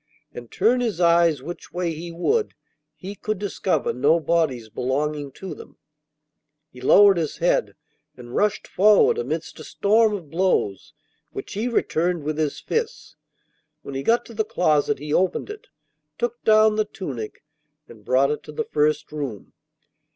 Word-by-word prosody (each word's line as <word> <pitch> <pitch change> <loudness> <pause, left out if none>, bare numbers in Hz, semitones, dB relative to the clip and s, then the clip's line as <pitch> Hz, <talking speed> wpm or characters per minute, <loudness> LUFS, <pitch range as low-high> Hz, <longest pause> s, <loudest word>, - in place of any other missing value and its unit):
And, 120 -1 -9
turn 240 +5 +2
his 225 -8 -2
eyes 170 -5 +3
which 175 +4 -8
way 175 -1 -2
he 170 +2 -7
would, 420 - 0 0.4
he 195 +2 -8
could 215 +1 -3
discover 185 -6 -1
no 145 +7 +3
bodies 155 -8 0
belonging 140 +5 -2
to 190 -4 -7
them. - - -13 0.9
He 125 - -13
lowered 200 +8 +6
his 160 -3 -2
head - - +1 0.4
and 120 -1 -11
rushed 210 0 +1
forward 215 - +4
amidst 465 - -4
a - - -8
storm 215 +1 +2
of 165 -8 -9
blows, 165 - 0 0.4
which - - -7
he 215 +4 -2
returned 175 -7 0
with 155 +1 -3
his 155 -2 -1
fists. 460 0 -4 0.7
When 140 - -8
he 135 - -3
got 230 +11 +2
to 230 - -12
the 220 0 0
closet, 175 -9 +1
he 150 +2 -5
opened 190 - 0
it, 430 +1 -11 0.5
took 240 0 -3
down 215 0 +5
the 215 - +2
tunic, 140 - -7 0.4
and 110 -3 -15
brought 130 +5 +2
it 150 - -3
to - - -9
the 150 - -3
first 150 0 +1
room. 140 -9 -6
170 Hz, 160 wpm, -23 LUFS, 145-210 Hz, 0.9 s, lowered